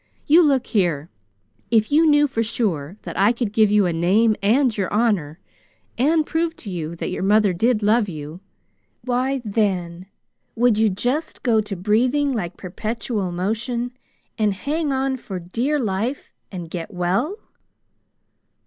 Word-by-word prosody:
You 320 +4 +6
look 280 -6 +2
here! 170 -7 0 0.6
If 220 0 +2
you 320 +2 +5
knew 295 -1 +5
for 230 -4 -2
sure 195 -7 -2
that - - -5
I 200 +3 +5
could 235 -3 -3
give 215 -2 +4
you 210 -1 +4
a 175 - 0
name 200 +7 +3
and 235 +4 +3
your 195 -3 -2
honor, 200 -8 0 0.6
and 305 +5 +2
prove 330 +1 -1
to 205 - -8
you 165 -2 -4
that - - -4
your - - -4
mother 205 0 +3
did 220 +4 +1
love 215 0 +3
you, 155 0 -7 0.6
why, 255 +1 -1
then, 185 -4 -1 0.5
would 235 -2 +3
you 220 -1 +4
just 250 - -2
go 225 -4 +3
to 205 -1 -5
breathing 245 +10 +1
like 185 -7 -4
perpetual 215 +1 -3
motion 225 +7 -2 0.5
and 210 -2 +2
hang 295 - -2
on 265 0 0
for 195 -6 -7
dear 230 - -1
life 225 +4 -3 0.2
and 175 -4 -7
get 170 0 -5
well?" 190 - -1
215 Hz, 155 wpm, -22 LUFS, 185-250 Hz, 0.6 s, You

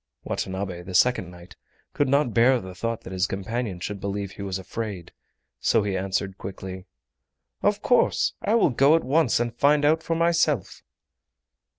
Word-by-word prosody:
Watanabe, 95 -2 -4
the 90 +1 -7
second 125 -5 +3
knight, 90 0 -14 0.4
could 145 -2 +1
not 140 -4 +2
bear 125 +2 +4
the 95 -2 -9
thought 115 +5 -3
that 95 - -9
his 95 0 +1
companion 100 0 -3
should 100 +3 -5
believe 100 -1 -3
he 100 - -10
was 95 -1 -3
afraid, 95 -2 -6 0.5
so - - +2
he 100 -2 -2
answered 95 0 -2
quickly: 95 0 -7 0.7
"Of 205 0 +1
course, 245 - +2
I 215 - +1
will 220 -10 +4
go 140 +5 +5
at 165 - +1
once 140 -2 +2
and 120 -1 -1
find 145 +3 +3
out 160 +2 +3
for 165 0 -2
myself!" 165 - +1
105 Hz, 170 wpm, -25 LUFS, 95-140 Hz, 0.7 s, go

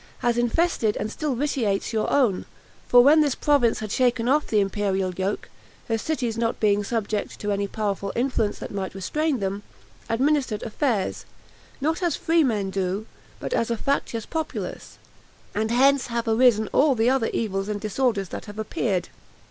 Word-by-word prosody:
has 240 -1 +1
infested 240 -1 +1
and 215 +1 -3
still 300 -1 -2
vitiates 235 -7 -1
your 220 -1 0
own; 240 -10 +2 0.4
for 245 0 +7
when 305 +4 +6
this 290 -4 +1
province 275 -8 +2
had 215 -2 -5
shaken 245 -1 +1
off 295 +3 +2
the 215 - +2
imperial 195 -2 0
yoke, 190 +3 -2 0.4
her 225 - +1
cities 235 -2 -2
not 230 0 0
being 205 -1 +2
subject 215 -1 -3
to 205 - -2
any 200 0 0
powerful 200 -1 -2
influence 235 -4 0
that - - -7
might 195 -1 -4
restrain 295 +9 -1
them, 195 0 -2 0.5
administered 260 -2 +1
affairs, 225 -3 -1 0.5
not 320 +5 0
as 345 -4 +1
free 330 0 +2
men 210 -7 0
do, 195 +2 -2 0.3
but - - -4
as 230 - +1
a 235 - 0
factious 230 -4 -1
populace; 320 -1 -5 0.6
and 220 +1 -1
hence 270 +3 +4
have 235 -1 -2
arisen 225 -1 +4
all 280 -1 +4
the 225 0 +2
other 255 -3 +2
evils 195 -2 -2
and 210 -1 -2
disorders 215 -2 0
that - - -6
have 205 -1 -10
appeared. 210 -3 -1
230 Hz, 170 wpm, -24 LUFS, 205-265 Hz, 0.6 s, for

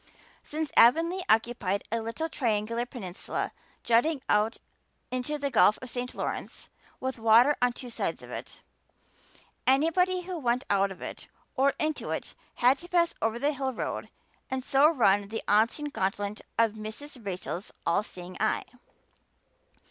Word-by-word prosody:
Since 310 0 -4
Avonlea 330 +10 +5
occupied 220 -4 +2
a 230 0 0
little 230 +9 -3
triangular 230 -3 -1
peninsula 195 -8 -4 0.3
jutting 260 +5 +2
out 210 +2 +2 0.5
into 255 +4 -2
the 280 -1 -2
Gulf 210 - +5
of 255 -1 -6
St. 250 0 -4
Lawrence - - -5 0.3
with 260 -2 -3
water 230 +6 +6
on 245 0 +4
two 245 0 -8
sides - - -3
of - - -11
it, - - -8 1.0
anybody 330 +7 +3
who 360 -1 -5
went 245 -1 +1
out 200 0 +3
of 190 - -9
it - - -7 0.3
or 275 +1 +3
into 310 -1 -1
it - - -4 0.2
had 255 +3 +4
to 350 - -10
pass 345 -1 +3
over 225 +1 0
that 285 +4 +1
hill 265 -1 -1
road - - -4 0.4
and 265 0 -2
so 275 +3 +5
run 205 -9 +3
the 220 +2 -4
unseen 225 +8 +3
gauntlet 200 -3 -2 0.2
of 230 -1 +4
Mrs. 220 +5 -8
Rachel's 185 -1 -4
all 170 +4 +3
seeing 180 -3 -9
eye. 215 - +1
245 Hz, 150 wpm, -28 LUFS, 215-290 Hz, 1.0 s, water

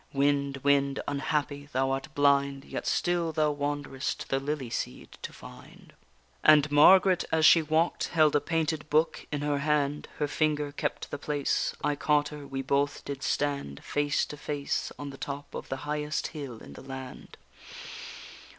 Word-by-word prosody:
Wind, 140 0 +1
wind, 140 -1 +3
unhappy! 145 0 -2
thou 135 +1 +1
art 135 0 -2
blind, 140 -1 +2
Yet - - -5
still 175 -2 +1
thou 155 -1 +2
wanderest 145 -2 -3
the 135 - +1
lily 135 -3 -3
seed - - -4
to - - -6
find._ - - -14 0.5
And 155 -1 +6
Margaret 185 +5 +6
as 160 -1 +3
she 165 - +8
walk'd 160 +2 +1
held 155 -3 +3
a 145 - +4
painted 160 -1 -1
book 155 +2 +1
in 145 -1 -2
her 145 -1 0
hand; 150 0 0
Her 150 - 0
finger 150 -1 0
kept - - -3
the 145 - -4
place; 145 -1 -1
I 145 0 +1
caught 145 0 +2
her, 150 -2 -9
we 135 0 -4
both 140 +2 0
did 140 -2 -5
stand 140 - -2
Face 145 0 0
to 150 - -9
face, 145 -1 -3
on 145 -1 -6
the 135 - -11
top 140 0 -6
of - - -7
the 135 - -2
highest 150 0 -2
hill 135 -7 -7
in 70 - -11
the - - -11
land. 130 -1 -9
145 Hz, 170 wpm, -28 LUFS, 140-150 Hz, 0.5 s, she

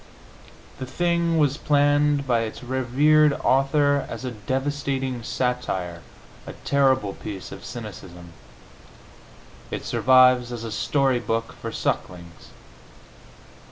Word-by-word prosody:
The 130 - -5
thing 170 +3 0
was 145 -2 +2
planned 145 0 +2
by 120 -3 +2
its 115 +2 -5
rev. 140 +4 +3
author 140 +1 +3
as - - -6
a 125 - -3
devastating 130 +2 -3
satire, 105 -9 -3 0.5
a - - -7
terrible 130 -7 +2
piece 95 -3 -8
of 95 - -10
cynicism; 90 -6 -9 1.4
it - - -5
survives 130 -1 +4
as 120 -1 -6
a 115 - -5
story 135 +3 +1
book 115 -1 -3
for 115 - -7
sucklings. 85 -5 -4
130 Hz, 110 wpm, -24 LUFS, 115-145 Hz, 1.4 s, survives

